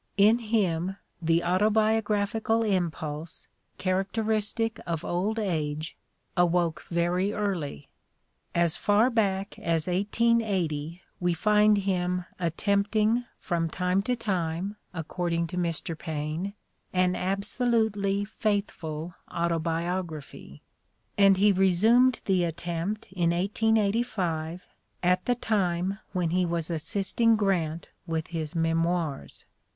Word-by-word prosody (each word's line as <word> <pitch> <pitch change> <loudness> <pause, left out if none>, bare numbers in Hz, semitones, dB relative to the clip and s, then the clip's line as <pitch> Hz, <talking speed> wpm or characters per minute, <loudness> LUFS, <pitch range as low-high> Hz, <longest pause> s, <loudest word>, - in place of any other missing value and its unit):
In 215 +4 +6
him 195 -5 0 0.2
the 165 0 +2
autobiograph 210 +2 +2
ical 225 +1 +1
impulse, 160 -4 -3 0.3
characteristic 215 +4 0
of 170 -1 -2
old 195 +6 -1
age, 155 -6 -2 0.4
awoke 175 -1 +2
very 175 +3 +1
early: 175 - -3 0.7
as 170 -1 +3
far 210 +7 +3
back 200 -4 0
as 165 -2 0
1880 185 -5 0 0.2
we 175 -1 +1
find 210 +3 +4
him 180 -2 0
"attempting, 205 +6 +1
from 170 -2 -1
time 180 +3 +1
to 250 +5 0
time," 185 -3 -2 0.2
according 170 0 -2
to 165 - -7
Mr. 170 -2 -1
Paine, 160 +5 -4 0.4
"an 180 0 +2
absolutely 200 +1 0
faithful 185 -7 -2 0.2
autobiography"; 165 - -3 0.5
and 195 -1 +5
he 205 +2 +5
resumed 215 +7 +4
the 185 -2 +2
attempt 170 +5 -3
in 175 -3 +1
1885, 195 -3 0 0.4
at 180 +1 +3
the 245 - +2
time 195 -4 0
when 180 -4 0
he 180 +1 +2
was 170 -1 -1
assisting 195 +8 +2
Grant 175 -6 0 0.2
with 160 -1 -2
his 160 -1 -4
Memoirs. 165 -2 -1
180 Hz, 105 wpm, -27 LUFS, 170-210 Hz, 0.7 s, In